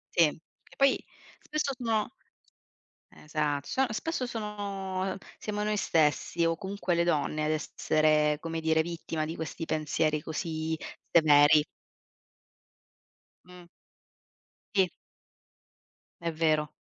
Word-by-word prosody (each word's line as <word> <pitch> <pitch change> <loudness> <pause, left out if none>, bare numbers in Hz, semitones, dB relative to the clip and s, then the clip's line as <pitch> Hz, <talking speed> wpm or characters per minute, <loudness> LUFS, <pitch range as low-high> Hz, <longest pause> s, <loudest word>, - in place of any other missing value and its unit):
Sì, 165 -3 +6
che 160 - -17
poi 275 0 +3 0.4
spesso 300 -2 -2
sono 225 -4 0 1.0
Esatto, 150 -2 -2
son 265 0 +1
spesso 295 +3 -2
sono, 200 -4 -3
ehm - - -7 0.2
siamo 210 -1 -3
noi 210 0 0
stessi 165 0 +2
o 165 0 +2
comunque 190 -2 -2
le 170 - +3
donne 155 -2 0
ad 155 - +1
essere, 155 -1 +2
come 165 0 -4
dire, 160 0 +3
vittima 165 -1 -3
di 160 +2 -5
questi 160 +1 -5
pensieri 155 0 0
così 160 0 -3 0.4
severi. 150 -2 +6 1.8
Mh. 180 -1 -13 1.1
Sì. 190 -3 +4 1.3
È 170 -1 -2
vero. 155 -1 +1
165 Hz, 110 wpm, -29 LUFS, 155-195 Hz, 1.8 s, Sì